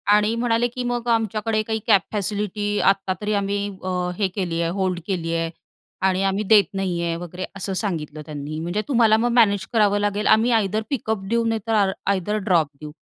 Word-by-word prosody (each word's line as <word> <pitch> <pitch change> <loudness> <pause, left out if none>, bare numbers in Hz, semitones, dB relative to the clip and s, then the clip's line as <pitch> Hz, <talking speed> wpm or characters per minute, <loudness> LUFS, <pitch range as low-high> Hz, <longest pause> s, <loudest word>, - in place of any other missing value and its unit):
आणि 210 +2 +2
म्हणाले, 235 0 +1
की 245 +1 -5
"मग 245 -1 -2
आमच्याकडे 220 -1 +1
काही 220 0 -1
कॅब 200 -4 +6
फॅसिलिटी 205 0 -1
आत्ता 195 -1 +2
तरी 210 0 -1
आम्ही 200 0 0 0.3
अ, 180 -1 -1
हे 205 - +2
केली 175 -4 -1
आहे, 165 - 0
होल्ड 185 -1 -1
केली 170 -4 -2
आहे 165 0 -1 0.6
आणि 190 0 +1
आम्ही 195 +2 0
देत 215 -2 +7
नाही 185 -3 -2
आहे," 170 -1 -1
वगैरे 175 +2 -6
असं 195 0 -3
सांगितलं 155 -6 -4
त्यांनी. 150 +1 -6
"म्हणजे 175 +6 -2
तुम्हाला 230 -5 +4
मग 240 +2 +1
मॅनेज 205 -6 +4
करावं 205 -2 +3
लागेल, 205 0 0
आम्ही 225 +3 +4
आयदर 215 -2 +1
पिकअप 220 -7 -2
देऊ, 230 0 +1
नाही 225 -1 0
तर 225 - +1
आ 190 - 0 0.2
आयदर 200 +2 -1
ड्रॉप 165 -4 +4
देऊ," 150 0 -7
205 Hz, 200 wpm, -22 LUFS, 180-220 Hz, 0.6 s, देत